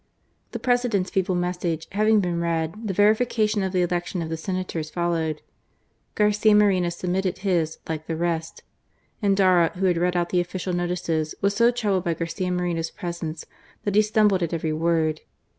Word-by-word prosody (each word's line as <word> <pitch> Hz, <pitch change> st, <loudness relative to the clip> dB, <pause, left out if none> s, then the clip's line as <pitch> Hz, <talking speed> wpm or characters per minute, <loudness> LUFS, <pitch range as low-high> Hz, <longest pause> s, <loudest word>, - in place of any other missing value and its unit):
The -, -, -4 dB
President's 245 Hz, -7 st, 0 dB
feeble 190 Hz, -1 st, 0 dB
message 175 Hz, -2 st, -2 dB
having 215 Hz, +1 st, +3 dB
been 175 Hz, -2 st, -1 dB
read, 165 Hz, -1 st, -1 dB
the -, -, 0 dB
verification 215 Hz, 0 st, +2 dB
of 190 Hz, -1 st, -1 dB
the 180 Hz, -1 st, +2 dB
election 175 Hz, 0 st, -2 dB
of 160 Hz, -, -5 dB
the 160 Hz, -, -2 dB
Senators 175 Hz, -2 st, -4 dB
followed. 165 Hz, -3 st, -1 dB, 0.7 s
Garcia 210 Hz, 0 st, +4 dB
Moreno 195 Hz, -4 st, +3 dB
submitted 180 Hz, +2 st, -2 dB
his, 170 Hz, -5 st, +1 dB
like 160 Hz, -1 st, -4 dB
the 165 Hz, -, -2 dB
rest. 165 Hz, -1 st, -3 dB, 0.6 s
Endara, 190 Hz, -4 st, +4 dB
who 190 Hz, +1 st, -1 dB
had 180 Hz, -, +4 dB
to 170 Hz, -, -2 dB
read 180 Hz, 0 st, +1 dB
out 175 Hz, 0 st, 0 dB
the 180 Hz, -, +2 dB
official 180 Hz, +1 st, -4 dB
i8o -, -, 0 dB
GARCIA 175 Hz, 0 st, -1 dB
MORENO. -, -, -6 dB, 0.3 s
notices, 155 Hz, -, -8 dB
was 200 Hz, 0 st, +1 dB
so 235 Hz, +2 st, +5 dB
troubled 210 Hz, -7 st, 0 dB
by 170 Hz, -1 st, 0 dB
Garcia 165 Hz, +3 st, -3 dB
Moreno's^ 175 Hz, -2 st, -2 dB
presence, 170 Hz, -3 st, -5 dB, 0.4 s
that 205 Hz, -, -1 dB
he 210 Hz, -, +6 dB
stumbled 210 Hz, -3 st, +2 dB
at 170 Hz, 0 st, -1 dB
every 160 Hz, -1 st, -2 dB
word. 160 Hz, -1 st, 0 dB
180 Hz, 185 wpm, -24 LUFS, 165-200 Hz, 0.7 s, he